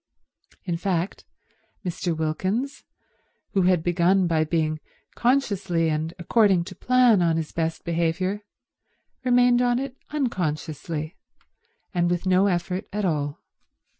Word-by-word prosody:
In 175 -3 -1
fact 180 0 -2 0.6
Mr. 175 -1 -2
Wilkins, 190 - -2 0.7
who 195 - +2
had 180 -3 +2
begun 175 +2 +3
by 160 -2 +2
being 155 -1 0 0.3
consciously 200 -10 +1
and 155 +1 -1
according 190 -1 +3
to 185 +2 -10
plan 245 -1 +4
on 165 -2 +2
his 160 -2 -3
best 165 -1 -2
behaviour, 170 +4 0 0.8
remained 245 -1 +4
on 245 -1 +2
it 265 0 -4
unconsciously, 160 - -3 0.8
and 175 -1 +2
with 175 +1 -1
no 185 +2 +4
effort 180 0 -1
at 210 0 -1
all. 145 -4 -2
180 Hz, 120 wpm, -25 LUFS, 165-205 Hz, 0.8 s, plan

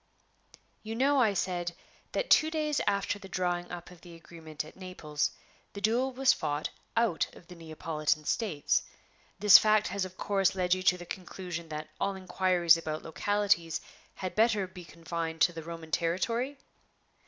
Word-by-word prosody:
"You 220 +1 -5
know," 270 +3 +3
I 215 -4 +3
said, 175 -2 -1 0.4
"that - - -2
two 310 - +6
days 305 -2 0
after 200 0 0
the 195 - -11
drawing 175 -1 -1
up 175 0 -8
of 175 -2 -15
the 170 -1 -12
agreement 160 -2 -8
at 155 - -14
Naples, 165 -6 -2 0.4
the 200 - -6
duel 235 +6 +1
was 260 +1 +4
fought 150 -1 -2 0.3
out 230 -8 +2
of - - -15
the 180 - -12
Neapolitan 155 -2 -2
States. 175 -9 +1 0.6
This 205 -1 +9
fact 215 -1 +3
has 200 - -1
of 185 0 -7
course 195 -2 +1
led 180 -1 +2
you 185 - -1
to 185 -1 +4
the 175 - -9
conclusion 175 -2 -6
that 155 0 -6
all 200 - 0
inquiries 185 -3 +3
about 155 -2 -4
localities 170 -1 +1 0.4
had 185 -1 -4
better 215 -3 +3
be 180 -1 -11
confined 165 -1 -5
to 175 +3 +5
the 165 - -6
Roman 165 0 -8
territory?" 230 - 0
180 Hz, 165 wpm, -30 LUFS, 165-205 Hz, 0.6 s, This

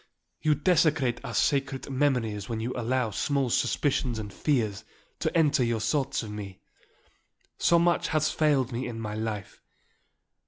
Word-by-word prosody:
You 155 -1 +3
desecrate 150 -6 +2
our - - -5
sacred 135 -2 0
memories 125 -7 0
when 115 -1 -2
you 120 +3 -3
allow 125 -1 0
small 135 +4 0
suspicions 130 -3 +1
and 105 -2 -6
fears 110 -8 0 0.4
to - - 0
enter 150 -5 +3
your 115 -1 0
thoughts 135 +4 0
of 105 - -7
me. 100 -3 -7 1.0
So 170 - +4
much 170 +1 +2
has 155 -1 +1
failed 140 -5 +2
me 120 +2 -3
in 115 -2 -6
my 105 -2 -4
life. 110 -2 -5
125 Hz, 150 wpm, -27 LUFS, 110-145 Hz, 1.0 s, So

